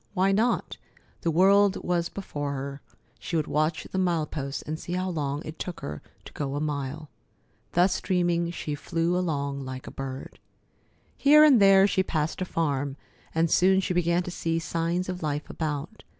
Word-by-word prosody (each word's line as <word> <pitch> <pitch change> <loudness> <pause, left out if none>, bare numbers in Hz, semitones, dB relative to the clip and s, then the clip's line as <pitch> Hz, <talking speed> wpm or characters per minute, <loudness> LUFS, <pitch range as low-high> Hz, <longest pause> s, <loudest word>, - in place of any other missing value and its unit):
Why 190 +1 +3
not? 225 +5 +1 0.4
The 170 - 0
world 195 +4 +5
was 175 -1 0
before 145 -7 -4
her. 140 0 -5 0.4
She 170 - -4
would 155 -2 +1
watch 155 +2 0
the 190 - -1
mile 170 -4 +1
posts 140 -2 -5
and 155 +1 -5
see 175 - -6
how 185 +1 -1
long 145 -2 -2
it 155 +1 -8
took 180 - -5
her 75 0 -6 0.2
to - - -11
go 140 -1 -3
a - - -1
mile. 145 0 -4 0.6
Thus 180 +2 +3
dreaming, 175 -2 +1
she 160 -3 -4
flew 165 +4 -1
along 140 -6 -1
like 130 0 -7
a - - -8
bird. 135 -1 -7 0.8
Here 300 +2 +7
and 275 -8 +7
there 195 -1 +7
she 195 -1 +2
passed 160 -2 -2
a - - 0
farm, 145 -5 -1 0.4
and 165 0 +2
soon 190 +1 +5
she 185 - -1
began 175 0 +2
to 180 - -6
see 165 -1 -1
signs 170 +2 -1
of 180 -1 -4
life 150 -1 -2
about. 155 +5 -4
165 Hz, 180 wpm, -27 LUFS, 145-185 Hz, 0.8 s, Here